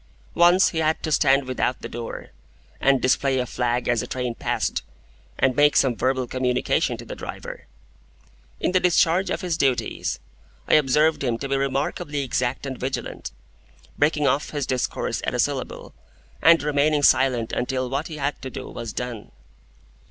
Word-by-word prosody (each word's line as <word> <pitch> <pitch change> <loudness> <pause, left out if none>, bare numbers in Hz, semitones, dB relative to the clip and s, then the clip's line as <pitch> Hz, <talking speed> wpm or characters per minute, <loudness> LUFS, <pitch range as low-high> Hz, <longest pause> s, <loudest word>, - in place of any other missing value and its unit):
Once 175 +2 +5
he 160 - -3
had 160 0 0
to 155 - -2
stand 140 -1 +4
without 130 -1 -1
the - - -3
door, 115 0 -7 0.5
and 135 -1 +3
display 135 +1 +2
a 125 - 0
flag 120 0 -1
as 120 -2 +2
a - - -6
train 125 -2 -3
passed, - - -2 0.6
and 130 -1 +2
make 145 0 +4
some 130 -3 +3
verbal 130 +1 0
communication 125 0 0
to - - -10
the - - -7
driver. - - -8 0.9
In - - 0
the 185 - +3
discharge 180 +1 +3
of - - -2
his 175 -3 -1
duties, 135 -3 0 0.5
I - - +2
observed 150 +1 +3
him 120 -3 0
to 140 - -5
be 135 - 0
remarkably 140 +2 -1
exact 125 +1 -2
and 130 -2 -5
vigilant, 130 +1 -4 0.6
breaking 150 0 +2
off 140 +1 +1
his 145 -3 -3
discourse 130 -1 -2
at - - -2
a - - -2
syllable, - - -2 0.5
and 165 -1 +6
remaining 150 0 +2
silent 130 -5 +3
until 130 +1 -1
what 140 +5 -2
he 155 - -7
had 145 0 -2
to 130 - -5
do - - -7
was 115 -3 -7
done. 125 -4 -5
135 Hz, 170 wpm, -23 LUFS, 125-150 Hz, 0.9 s, and